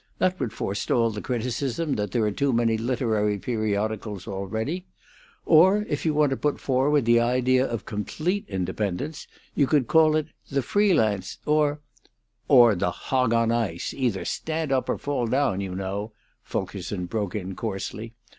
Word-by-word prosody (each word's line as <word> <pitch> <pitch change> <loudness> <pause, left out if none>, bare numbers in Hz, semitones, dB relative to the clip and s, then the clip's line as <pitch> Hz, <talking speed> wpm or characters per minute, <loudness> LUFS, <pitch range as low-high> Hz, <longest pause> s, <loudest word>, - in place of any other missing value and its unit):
That 185 0 +1
would 125 -6 -2
forestall 115 +4 0
the 105 -1 -5
criticism 130 +5 -2
that 105 -1 -2
there 115 +4 0
are 105 - +1
too 140 +7 0
many 115 -1 +2
literary 110 -3 0
periodicals 110 -2 -2
already. 110 - -3 0.6
Or, 190 +6 +5
if 145 +2 -2
you 155 - +2
want 150 -2 +3
to 135 - 0
put 150 -1 -1
forward 135 +1 +2
the 120 0 +5
idea 130 +2 +2
of 115 -3 -4
complete 160 - -2
independence, 105 - -3 0.3
you 140 - +2
could 145 -3 +3
call 155 +3 +4
it 155 0 -1 0.2
'The 140 -1 0
Free 205 +2 +3
Lance'; 100 -7 0
or 150 -1 +2 0.3
" - - -50 0.3
"Or 120 -5 +7
'The 90 -2 0
Hog 125 +6 0
on 115 0 +2
Ice' 110 -8 -1
either 120 -8 -1
stand 160 -2 -2
up 130 -1 +1
or - - 0
fall 135 -4 -2
down, 125 -6 +1
you 95 -2 -4
know," 100 +3 -4 0.3
Fulkerson 95 0 -4
broke 100 +1 -3
in 95 -2 -4
coarsely. 110 +2 -5
120 Hz, 165 wpm, -25 LUFS, 105-145 Hz, 0.6 s, Or